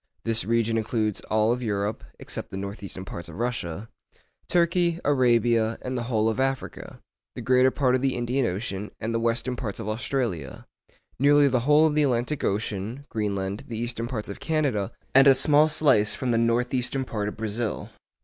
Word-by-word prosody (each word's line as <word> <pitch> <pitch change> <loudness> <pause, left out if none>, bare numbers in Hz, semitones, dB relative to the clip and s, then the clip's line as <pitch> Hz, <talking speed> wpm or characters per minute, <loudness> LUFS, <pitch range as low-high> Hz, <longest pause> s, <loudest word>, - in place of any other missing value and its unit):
This 115 0 +1
region 115 0 +1
includes 110 -2 -1
all 110 +3 +2
Europe, 105 -2 -2
except - - -5
the 95 - -6
north 100 +2 -6
eastern 95 -1 -8
parts 85 -2 -7
of 80 - -10
Russia; 110 -4 -3 0.6
Turkey, 170 -1 +2
Arabia, 120 -4 +3
and 130 0 -3
the 120 - -2
whole 110 -2 +2
of 115 +3 -1
Africa; 135 0 -3 0.4
the - - -6
greater 130 +1 +4
part 130 -1 +1
of 130 - +2
the 135 -1 +1
Indian 125 +1 0
Ocean, 100 +1 -4
and 115 +1 -3
the 115 - +1
western 120 +2 -1
parts 110 -6 -5
of - - -5
Australia; 110 - -3 0.5
nearly 145 +1 +5
the 130 -2 +2
whole 150 +1 +6
of 155 - +2
the 150 - +2
Atlantic 130 +1 0
Ocean; 105 +6 -2
Greenland, 100 -2 -3
the 115 - -5
eastern 120 0 -3
parts 115 -4 -4
of 100 - -7
Canada, 140 -11 0 0.2
and 135 +1 +7
a 135 - +8
small 145 +3 +4
slice 130 -9 +3
from 130 -2 -2
the 115 - +2
north 115 +2 +1
eastern 130 +1 0
part 105 -4 -3
of 105 - -5
Brazil. 110 +1 -3
115 Hz, 185 wpm, -25 LUFS, 105-130 Hz, 0.6 s, a